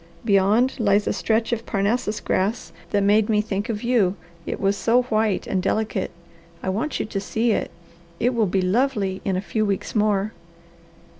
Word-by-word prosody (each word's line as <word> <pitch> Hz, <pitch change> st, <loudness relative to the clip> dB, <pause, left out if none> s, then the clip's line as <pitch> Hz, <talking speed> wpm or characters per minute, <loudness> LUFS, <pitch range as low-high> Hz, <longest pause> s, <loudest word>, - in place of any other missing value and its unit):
Beyond 215 Hz, +6 st, +3 dB
lies 205 Hz, -2 st, +3 dB
a -, -, 0 dB
stretch 225 Hz, +1 st, 0 dB
of 230 Hz, 0 st, -4 dB
Parnassus 210 Hz, +2 st, 0 dB
grass 205 Hz, +3 st, -1 dB, 0.2 s
that 200 Hz, -1 st, +1 dB
made 205 Hz, +2 st, +3 dB
me 215 Hz, -1 st, +3 dB
think 210 Hz, +1 st, -2 dB
of 215 Hz, -1 st, -3 dB
you, 225 Hz, -6 st, +2 dB, 0.3 s
it -, -, -3 dB
was 195 Hz, 0 st, +1 dB
so 240 Hz, +4 st, +2 dB
white 215 Hz, -4 st, 0 dB
and 190 Hz, -, -1 dB
delicate. 210 Hz, 0 st, -1 dB, 0.5 s
I -, -, -1 dB
want 230 Hz, +10 st, -2 dB
you -, -, -1 dB
to 210 Hz, -2 st, -3 dB
see 225 Hz, +4 st, 0 dB
it. -, -, 0 dB, 0.5 s
It 245 Hz, +2 st, +2 dB
will 225 Hz, -3 st, +2 dB
be 185 Hz, +1 st, 0 dB
lovely 200 Hz, -2 st, 0 dB
in 195 Hz, -, 0 dB
a -, -, -1 dB
few 215 Hz, +2 st, -1 dB
weeks 200 Hz, -2 st, -2 dB
more." 210 Hz, -1 st, +1 dB
210 Hz, 180 wpm, -23 LUFS, 195-230 Hz, 0.5 s, Beyond